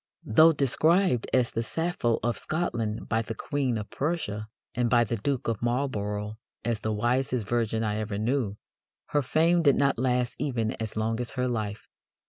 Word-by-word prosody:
Though 160 Hz, +9 st, +6 dB
described 155 Hz, -, +2 dB
as 125 Hz, -2 st, +2 dB
"the 115 Hz, -, -1 dB
Sappho 160 Hz, -3 st, 0 dB
of 120 Hz, +1 st, +1 dB
Scotland" 120 Hz, -10 st, -2 dB
by 110 Hz, -, +1 dB
the 115 Hz, 0 st, -5 dB
Queen 135 Hz, -4 st, -1 dB
of 105 Hz, -1 st, -6 dB
Prussia, 130 Hz, -9 st, -2 dB, 0.3 s
and 120 Hz, -1 st, +1 dB
by 120 Hz, -1 st, +5 dB
the 115 Hz, +1 st, -2 dB
Duke 130 Hz, +5 st, -2 dB
of 115 Hz, -3 st, -1 dB
Marlborough 110 Hz, -4 st, -2 dB, 0.3 s
as 115 Hz, -2 st, 0 dB
"the 110 Hz, -, -2 dB
wisest 120 Hz, +2 st, 0 dB
virgin 115 Hz, -2 st, 0 dB
I 105 Hz, -1 st, -1 dB
ever 105 Hz, -2 st, -3 dB
knew," 110 Hz, -2 st, 0 dB, 0.5 s
her 145 Hz, -, +2 dB
fame 165 Hz, +6 st, +3 dB
did 145 Hz, -4 st, +5 dB
not 140 Hz, -4 st, +2 dB
last 125 Hz, -1 st, +1 dB
even 120 Hz, -6 st, -1 dB
as 110 Hz, -1 st, -4 dB
long 110 Hz, +1 st, 0 dB
as 120 Hz, -1 st, -4 dB
her 125 Hz, 0 st, +1 dB
life. 110 Hz, -4 st, -3 dB
120 Hz, 175 wpm, -27 LUFS, 110-140 Hz, 0.5 s, Though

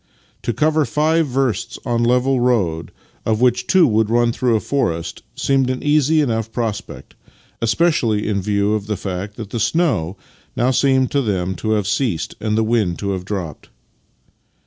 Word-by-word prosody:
To -, -, -1 dB
cover 155 Hz, +4 st, +2 dB
five 155 Hz, +2 st, +1 dB
versts 125 Hz, -3 st, -1 dB
of 120 Hz, -1 st, 0 dB
level 125 Hz, +2 st, +2 dB
road, 100 Hz, -10 st, 0 dB, 0.3 s
of 110 Hz, -1 st, 0 dB
which 125 Hz, 0 st, +2 dB
two 185 Hz, -3 st, +5 dB
would 110 Hz, -2 st, +2 dB
run 120 Hz, 0 st, +3 dB
through 115 Hz, -2 st, +1 dB
forest, 85 Hz, -12 st, -2 dB
seemed 135 Hz, -2 st, +1 dB
an 130 Hz, 0 st, -3 dB
easy 150 Hz, +1 st, +3 dB
enough 115 Hz, -5 st, -1 dB
prospect, 110 Hz, -4 st, -5 dB, 0.5 s
especially 115 Hz, -4 st, +1 dB
in 100 Hz, -2 st, 0 dB
view 100 Hz, +1 st, +1 dB
of 105 Hz, -1 st, -2 dB
the 105 Hz, -2 st, -2 dB
fact 95 Hz, +1 st, -5 dB
that 110 Hz, -4 st, -7 dB
the 120 Hz, -, -2 dB
snow 110 Hz, -, 0 dB, 0.4 s
now 125 Hz, +2 st, +2 dB
seemed 130 Hz, -1 st, +2 dB
to 140 Hz, -, +2 dB
them 95 Hz, -6 st, -1 dB
to 110 Hz, +6 st, -1 dB
have 105 Hz, -2 st, 0 dB
ceased 105 Hz, -, -1 dB
and 110 Hz, 0 st, -1 dB
the 110 Hz, -, +3 dB
wind 110 Hz, -6 st, +1 dB
to 100 Hz, -1 st, -3 dB
have 95 Hz, -1 st, -4 dB
dropped. 90 Hz, -7 st, -5 dB
115 Hz, 170 wpm, -19 LUFS, 100-130 Hz, 0.5 s, two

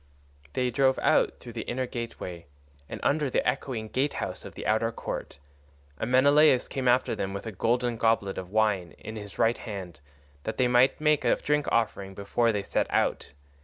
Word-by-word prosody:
They 125 Hz, -1 st, 0 dB
drove 130 Hz, +1 st, +3 dB
out -, -, +2 dB
through 120 Hz, -, -10 dB
the 115 Hz, -, -4 dB
inner 130 Hz, +2 st, -1 dB
gateway 115 Hz, -8 st, -6 dB, 0.4 s
and -, -, -6 dB
under 145 Hz, -1 st, +2 dB
the -, -, 0 dB
echoing 120 Hz, -5 st, -2 dB
gatehouse 140 Hz, +5 st, -2 dB
of -, -, -10 dB
the -, -, -7 dB
outer 110 Hz, +2 st, +2 dB
court, -, -, -6 dB, 0.6 s
and 110 Hz, -, -2 dB
Menelaus 140 Hz, 0 st, +5 dB
came 130 Hz, -2 st, -3 dB
after 125 Hz, +1 st, +3 dB
them 95 Hz, 0 st, -3 dB
with 100 Hz, -, -6 dB
a 110 Hz, -, -4 dB
golden 120 Hz, +4 st, 0 dB
goblet 115 Hz, -4 st, +1 dB
of 90 Hz, -1 st, -8 dB
wine 105 Hz, -5 st, +1 dB
in 110 Hz, -, -8 dB
his 105 Hz, -2 st, -8 dB
right 115 Hz, +1 st, +2 dB
hand 95 Hz, -7 st, -7 dB, 0.4 s
that -, -, -5 dB
they 125 Hz, -, +3 dB
might 125 Hz, +2 st, +4 dB
make 150 Hz, -1 st, +2 dB
a -, -, +4 dB
drink 150 Hz, 0 st, 0 dB
offering 100 Hz, -4 st, 0 dB
before 115 Hz, +4 st, +1 dB
they 105 Hz, -2 st, -2 dB
set -, -, 0 dB
out. -, -, 0 dB
115 Hz, 185 wpm, -27 LUFS, 105-130 Hz, 0.6 s, Menelaus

